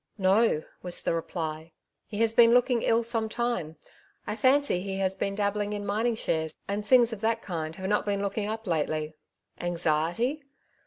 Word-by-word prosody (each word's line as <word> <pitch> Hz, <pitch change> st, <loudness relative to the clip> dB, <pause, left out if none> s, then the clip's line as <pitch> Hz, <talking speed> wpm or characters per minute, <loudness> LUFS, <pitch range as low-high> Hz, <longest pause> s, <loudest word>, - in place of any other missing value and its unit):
"Noj^' 190 Hz, -3 st, +3 dB, 0.2 s
was 180 Hz, -1 st, -3 dB
the -, -, +1 dB
reply. 160 Hz, -1 st, -4 dB, 0.4 s
''He 205 Hz, -, -4 dB
has 225 Hz, -1 st, +3 dB
been 235 Hz, 0 st, +6 dB
looking 245 Hz, -1 st, +3 dB
ill 230 Hz, +1 st, +2 dB
some 225 Hz, -1 st, -1 dB
time; 235 Hz, -9 st, -2 dB, 0.5 s
I 210 Hz, -, -3 dB
fancy 260 Hz, -4 st, +3 dB
he 195 Hz, 0 st, -4 dB
has 190 Hz, -1 st, 0 dB
been 195 Hz, +1 st, -2 dB
dabbling 205 Hz, 0 st, -1 dB
in 205 Hz, 0 st, -4 dB
mining 220 Hz, +4 st, 0 dB
shares, 160 Hz, -7 st, -1 dB
and 205 Hz, +1 st, -2 dB
things 240 Hz, 0 st, +5 dB
of 210 Hz, -, -7 dB
that 225 Hz, 0 st, 0 dB
kind 160 Hz, -3 st, -4 dB
have 190 Hz, +1 st, -5 dB
not 210 Hz, +1 st, 0 dB
been 200 Hz, 0 st, 0 dB
looking 205 Hz, +1 st, -2 dB
up 220 Hz, +1 st, -4 dB
lately.^' 155 Hz, -2 st, -1 dB, 0.3 s
" -, -, -35 dB
Anxiety 175 Hz, -, 0 dB
205 Hz, 180 wpm, -28 LUFS, 175-230 Hz, 0.5 s, been